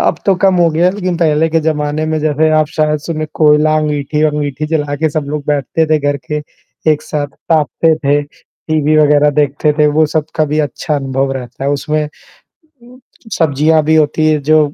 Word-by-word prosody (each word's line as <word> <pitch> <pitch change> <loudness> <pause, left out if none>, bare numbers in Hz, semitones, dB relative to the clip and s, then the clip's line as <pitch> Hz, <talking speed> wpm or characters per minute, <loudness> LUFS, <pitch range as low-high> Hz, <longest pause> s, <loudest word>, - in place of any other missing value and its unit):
अब - - +1
तो 195 - +4
कम 190 -1 +4
हो 170 -1 +4
गया 165 +3 +1
है 185 - +2
लेकिन 185 -3 -2
पहले 160 -1 +2
के 165 0 +1
ज़माने 150 0 -1
में 155 - 0
जैसे 155 +1 +1
आप 155 - +2
शायद 150 -1 +1
सुने 155 -2 -3
कोयला, 155 0 +4
अंगूठी-वंगूठी 150 -1 -1
जला 150 -2 -1
के 160 +2 0
सब 150 0 -2
लोग 150 -1 -4
बैठते 150 +2 0
थे 155 0 +2
घर 145 0 -1
के 150 0 -2 0.5
एक 150 - -3
साथ 145 -2 -3 0.2
ताप्ते 160 +1 +2
थे, 145 0 +1
टीवी 155 +1 -3
वगैरह 150 0 +4
देखते 145 +2 +1
थे 150 - +4
वो 155 - +4
सब 155 - +1
कभी 155 -1 0
अच्छा 155 +5 -4
अनुभव 135 0 -2
रहता 130 0 -7
है। 140 - +1
उसमें 150 +2 -1 1.3
सब्ज़ियाँ 155 0 +2
भी 160 +1 +3
होती 155 0 +2
हैं 150 - 0
जो 155 0 +6
150 Hz, 185 wpm, -14 LUFS, 145-155 Hz, 1.3 s, जो